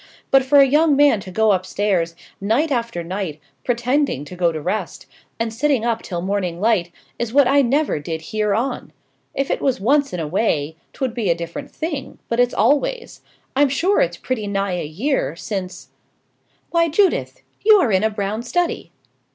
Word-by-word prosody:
but 270 - +6
for 265 +2 +3
a 275 - +8
young 295 +2 +3
man 285 -6 +4
to 190 - -9
go 220 +3 +2
upstairs, 185 -2 0 0.3
night 240 +10 +1
after 230 -8 -2
night, 175 -3 -4 0.2
pretending 245 - 0
to 180 - -9
go 175 -1 +2
to 160 - -4
rest, 185 +4 -3 0.3
and 225 -1 -2
sitting 260 -1 +1
up 230 -1 0
till 175 -2 -5
morning 185 -3 -2
light, 200 -5 +1 0.3
is 235 -2 -2
what 275 0 +5
I 280 +2 +4
never 275 - +1
did 160 +2 -5
hear 210 -2 +1
on. 245 +5 -3 0.4
If 275 - -1
it - - -1
was 265 -6 +1
once 280 +7 +2
in 180 - -4
a 160 - -2
way, 160 -4 0 0.2
'twould 260 -4 -3
be 230 -6 -1
a 170 - +3
different 170 - -7
thing; 300 -3 -5
but 235 - -1
it's 245 0 +4
always. 475 - 0 0.3
I'm 285 +1 +4
sure 355 +9 +2
it's 170 0 0
pretty 220 -2 -3
nigh 195 -2 -1
a - - -3
year 170 - -1
since 190 0 -6 0.4
" - - -43
"Why, 335 -1 +3
Judith, 380 +4 +1 0.2
you 430 +1 +7
are 320 - +3
in 190 +1 +2
a 220 - +3
brown 210 +1 -3
study!" 345 +8 -2
225 Hz, 190 wpm, -20 LUFS, 185-275 Hz, 0.4 s, a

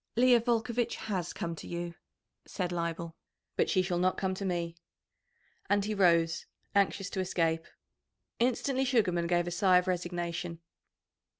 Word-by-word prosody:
"Leah 245 0 +6
Volcovitch 235 0 0
has 190 -6 -3
come 170 -1 -4
to - - -9
you," 170 0 -4 0.5
said 180 -3 -2
Leibel, 170 -1 -3 0.4
"but - - +2
she 185 - +3
shall 175 -1 -1
not 185 +1 +2
come 190 -1 0
to 190 - -5
me." 170 -2 -1 1.0
And 205 0 +3
he 215 - -1
rose, 170 -4 +3 0.3
anxious 200 -1 +2
to 190 - -3
escape. 165 -3 0 0.7
Instantly 255 +2 +1
Sugarman 195 -10 +2
gave 175 0 +2
a 175 - -3
sigh 185 +1 +4
of 180 - +2
resignation. 175 -1 -2
180 Hz, 145 wpm, -31 LUFS, 170-205 Hz, 1.0 s, Leah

